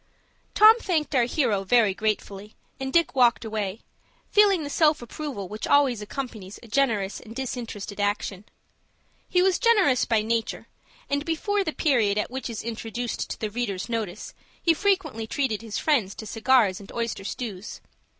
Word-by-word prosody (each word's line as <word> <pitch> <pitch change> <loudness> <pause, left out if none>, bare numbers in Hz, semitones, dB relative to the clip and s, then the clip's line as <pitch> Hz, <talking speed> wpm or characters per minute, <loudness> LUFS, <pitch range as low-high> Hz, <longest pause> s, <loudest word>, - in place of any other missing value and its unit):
Tom 440 +2 +8
thanked 320 -8 -1
our 250 -3 +4
hero 235 -7 0
very 215 0 +3
gratefully, 210 0 -3 0.2
and 265 0 -3
Dick 335 +1 +3
walked 245 -3 +3
away, 215 -2 -3 0.5
feeling 400 -5 +5
the 285 - -5
self 305 -1 +3
approval 240 -4 -6
which 215 +3 -5
always 270 -6 +3
accompanies 210 -4 -7
a - - -12
generous 220 -5 0
and 225 -1 -12
disinterested 230 -6 -5
action. 205 -1 -2 0.8
He 360 0 +3
was 380 -1 +2
generous 405 - +4
by 220 -2 +1
nature, 230 0 -2 0.4
and, 285 0 -1
before 395 +6 0
the 320 - -2
period 235 -11 +2
at 210 - -1
which 265 +1 -4
he 235 - -5
is 220 - -5
introduced 230 +1 -4
to - - -5
the 215 -1 -3
reader's 205 -4 -3
notice, 215 -4 -4 0.3
he 335 - +3
frequently 325 - 0
treated 230 -5 -1
his 220 -3 -5
friends 235 -11 +1
to 220 - -8
cigars 225 -3 +2
and 200 - -12
oyster 230 -4 -3
stews. 210 -2 -6
235 Hz, 165 wpm, -25 LUFS, 210-285 Hz, 0.8 s, Tom